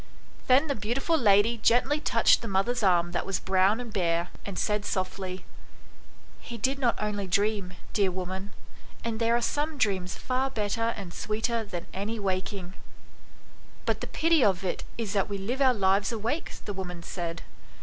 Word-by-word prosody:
Then 265 +4 +6
the 285 - 0
beautiful 245 - 0
lady 225 -3 +4
gently 250 +7 +3
touched - - +4
the 230 - -5
mother's 200 +6 +1
arm 175 -3 +3
that 175 - -1
was 195 - -1
brown 190 +4 +3
and 240 -3 -7
bare, 170 -2 +1 0.2
and 200 - -5
said 210 -1 0
softly 185 -1 -3 0.5
" - - -26
He 235 - -5
did 265 +5 0
not 245 -3 +1
only 205 -2 -2
dream, 200 0 +1 0.2
dear 200 -3 +3
woman, 185 +2 -5 0.5
and 230 -1 -2
there 230 0 +3
are 240 - +1
some 295 +4 -1
dreams 190 -7 0
far 260 +1 0
better 230 -1 -1
and 190 -4 -7
sweeter 225 +2 -1
than 180 -5 -6
any 205 +4 -3
waking." 190 -2 -3 1.1
"But - - 0
the - - -4
pity 325 -3 +3
of 190 -2 +2
it 185 - -2
is 225 -4 -3
that 200 0 +1
we 200 - -2
live 235 +8 -3
our 265 -2 +6
lives 200 -1 +2
awake," 230 +8 -2
the 205 - -3
woman 180 -3 -6
said. 170 -2 -4
205 Hz, 175 wpm, -28 LUFS, 190-235 Hz, 1.1 s, Then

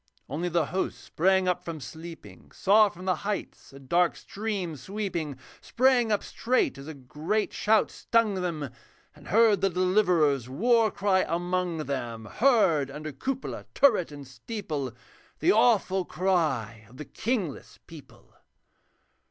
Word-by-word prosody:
Only 165 +6 -3
the 170 -2 +1
hosts 185 +6 -3
sprang 190 +2 +1
up 180 0 0
from 165 -2 -6
sleeping, 160 +6 -11
Saw 210 +2 +5
from 180 0 -11
the 185 -1 +1
heights 205 0 -5
a 135 - -12
dark 170 +6 +1
stream 200 -6 -4
sweeping; 170 -4 -4 0.2
Sprang 245 -2 +2
up 205 - +1
straight 250 - 0
as 135 - -10
a 160 - -7
great 150 +11 -2
shout 220 -1 +2
stung 230 -3 +1
them, 170 -8 -3 0.4
And 150 - -16
heard 215 -2 +4
the 195 - +3
Deliverer's 180 - +2
war 225 - +3
cry 190 -1 +1
among 175 0 -1
them, 120 -5 -4
Heard 190 - +3
under 150 +2 -6
cupola, 260 - -4
turret, 215 - +4
and 145 -2 -10
steeple 140 - -5 0.5
The - - +3
awful 210 -4 +3
cry 135 - -1
of 125 - -16
the 150 - -7
kingless 205 - -3
people. 150 -6 -15
180 Hz, 140 wpm, -27 LUFS, 150-210 Hz, 0.5 s, Saw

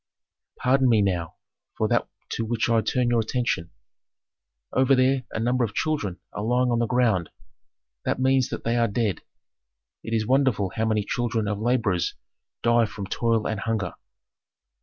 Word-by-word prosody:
"Pardon 130 0 +3
me 110 -3 +4
now 90 -4 -1 0.4
for - - +1
that - - +1 0.2
to - - -2
which 115 +1 0
I 115 -1 +4
turn 125 +1 0
your 120 - +3
attention: 110 -7 -1 1.0
Over 130 +1 +4
there 130 0 +2
a - - -4
number 125 +2 +1
of 110 -3 -3
children 105 - -1
are - - -4
lying 125 +3 +2
on 120 - +1
the 120 - +1
ground; 115 -9 +2 0.7
that - - -1
means 130 -1 +3
that - - -5
they 115 +1 0
are 115 0 +3
dead. 105 -3 -1 0.8
It 115 - -3
is 110 -1 0
wonderful 125 -7 +2
how 110 - 0
many 110 -2 +1
children 115 -2 -1
of 105 -1 -2
laborers 110 -7 0 0.5
die 120 0 +4
from 105 -1 -6
toil 115 +2 0
and 110 - -2
hunger. 105 -4 -2
115 Hz, 165 wpm, -25 LUFS, 105-125 Hz, 1.0 s, me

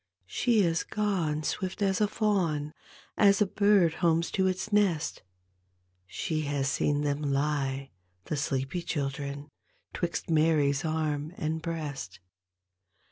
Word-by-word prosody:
She 225 - +2
is 165 -3 +2
gone 180 -8 -1
swift 185 +4 -3
as 195 0 +1
a 210 - +4
fawn, 175 -9 0 0.4
As 200 -1 +5
a 210 - +4
bird 200 -4 +3
homes 170 -1 +2
to 190 -1 +2
its 185 +3 -2
nest, 190 -7 +1 0.9
She 155 - -2
has 140 -1 -1
seen 145 0 +1
them 145 0 -1
lie, 140 -1 -1 0.3
the - - -2
sleepy 140 +3 -1
children, 140 -1 -4 0.4
"Twixt 175 -1 -2
Mary's 155 -4 +3
arm 155 0 -2
and 160 +1 -2
breast. 150 - -5
155 Hz, 125 wpm, -29 LUFS, 145-185 Hz, 0.9 s, As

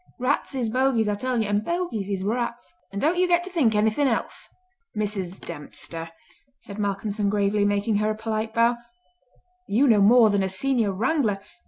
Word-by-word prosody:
Rats 255 +2 -1
is 240 -4 -1
bogies, 255 -3 +2
I 210 - +1
tell 250 +3 -2
you, 220 - 0
and 205 +1 0
bogies 340 - -3
is 195 -2 -2
rats; 235 - -3 0.2
and 200 - -4
don't 325 - +1
you 365 - +3
get 345 0 +3
to 370 - -8
think 265 -11 +2
anything 220 +7 +2
else!" 230 - -3 0.5
"Mrs. 195 -3 -3
Dempster," 165 +3 -5 0.5
said 200 +1 -9
Malcolmson 205 0 -1
gravely, 205 0 +1
making 205 +1 +1
her 210 +1 +1
a 215 - -1
polite 220 0 -3
bow, 235 +1 +2 0.9
"you 245 +8 +3
know 220 -4 +5
more 225 +1 +6
than 200 -1 +1
a 190 - 0
Senior 225 +2 0
Wrangler! 220 0 0
215 Hz, 180 wpm, -24 LUFS, 200-250 Hz, 0.9 s, more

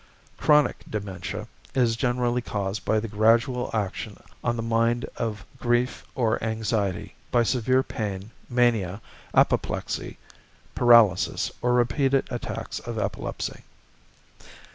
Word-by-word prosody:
=Chronic 150 -3 +4
Dementia= 100 -4 -5 0.3
is 120 -3 +3
generally 125 0 0
caused 100 -2 -3
by 110 - +2
the 115 - -4
gradual 115 +4 +2
action 105 -4 -3 0.3
on 120 -1 +1
the 115 - -3
mind 115 +1 +1
of 105 -3 -3
grief 120 +1 +1
or 115 -5 +1
anxiety, 110 -4 -1 0.2
by 120 - +3
severe 130 +2 +2
pain, 100 -2 -4 0.2
mania, 115 -6 +2 0.4
apoplexy, - - +1 0.6
paralysis, 115 -7 +5
or 125 0 +2
repeated 135 +3 +2
attacks 120 - -4
of - - -6
epilepsy. - - -3
115 Hz, 110 wpm, -26 LUFS, 105-125 Hz, 0.6 s, paralysis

